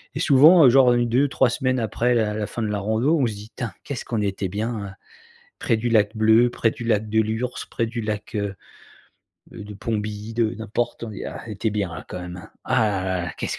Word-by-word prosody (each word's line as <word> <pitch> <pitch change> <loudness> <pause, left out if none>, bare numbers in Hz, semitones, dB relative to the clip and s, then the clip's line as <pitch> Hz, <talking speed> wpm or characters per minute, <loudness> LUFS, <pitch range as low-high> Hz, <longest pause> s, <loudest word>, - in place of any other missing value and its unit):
et - - -3
souvent, 155 +4 +7
heu, - - +8
genre 125 -1 +6
1-2-3 125 +2 +2
semaines 130 +1 0
après 120 +2 0
la 105 -2 +1
la 105 -1 -2
fin 120 - -5
de - - -1
la 105 -1 -2
rando, 110 +10 +1
on 125 - +2
se 110 - -4
dit: 105 +2 -10
«Putain, 120 -3 -4
qu'est-ce 140 - -5
qu'on 110 -3 -2
était 95 -2 -2
bien 110 +3 -3
là», 100 -1 -7 0.6
près 115 - +1
du 120 +2 -1
lac 110 -1 +2
bleu, 110 +2 +4
près 115 - +1
du 120 - -8
lac 110 -2 0
de 110 +1 +2
Lhurs, 110 +3 -2 0.2
près 115 - -1
du 115 +1 -4
lac, 105 0 -4
heu, 100 -1 -2 1.0
de 105 -2 -9
Pomby, 105 +1 -4
de 115 -2 +1
n'importe, 115 +2 -3
on 110 - -7
dit: 105 - -7
«Ah - - -6
on - - -8
était 105 +1 -2
bien 100 -5 -2
là - - -8
quand 90 - -6
même 90 0 -7
hein. - - -12
Ah 110 -1 +2
là 95 -2 -1
là, 85 - -5
qu'est - - -2
ce - - -4
110 Hz, 240 wpm, -23 LUFS, 105-120 Hz, 1.0 s, heu